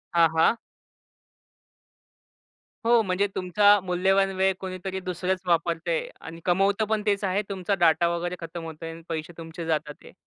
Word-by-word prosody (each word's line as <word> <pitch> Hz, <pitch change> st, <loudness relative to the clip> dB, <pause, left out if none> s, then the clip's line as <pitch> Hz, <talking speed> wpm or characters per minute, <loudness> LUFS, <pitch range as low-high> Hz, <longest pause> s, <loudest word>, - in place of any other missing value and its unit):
हां, 165 Hz, -1 st, +6 dB
हां. 165 Hz, +8 st, +4 dB, 2.3 s
हो 235 Hz, -1 st, +5 dB
म्हणजे 195 Hz, 0 st, 0 dB
तुमचा 205 Hz, +3 st, +4 dB
मूल्यवान 190 Hz, +2 st, +2 dB
वेळ 190 Hz, 0 st, +2 dB
कुणीतरी 190 Hz, 0 st, -5 dB
दुसरंच 185 Hz, +1 st, -2 dB
वापरतंय 170 Hz, -1 st, 0 dB
आणि 165 Hz, +1 st, -9 dB
कमवत 195 Hz, +4 st, +2 dB
पण 220 Hz, -1 st, +1 dB
तेच 200 Hz, -1 st, +1 dB
आहे 195 Hz, +2 st, +1 dB
तुमचा 195 Hz, 0 st, -1 dB
डाटा 170 Hz, +1 st, +4 dB
वगैरे 175 Hz, +1 st, -3 dB
खतम 165 Hz, 0 st, -7 dB
होतोय 160 Hz, 0 st, -7 dB
आणि 165 Hz, 0 st, -10 dB
पैसे 160 Hz, +1 st, -4 dB
तुमचे 165 Hz, +1 st, -7 dB
जातात 150 Hz, -2 st, -1 dB
आहे. -, -, -14 dB
180 Hz, 145 wpm, -26 LUFS, 165-195 Hz, 2.3 s, हां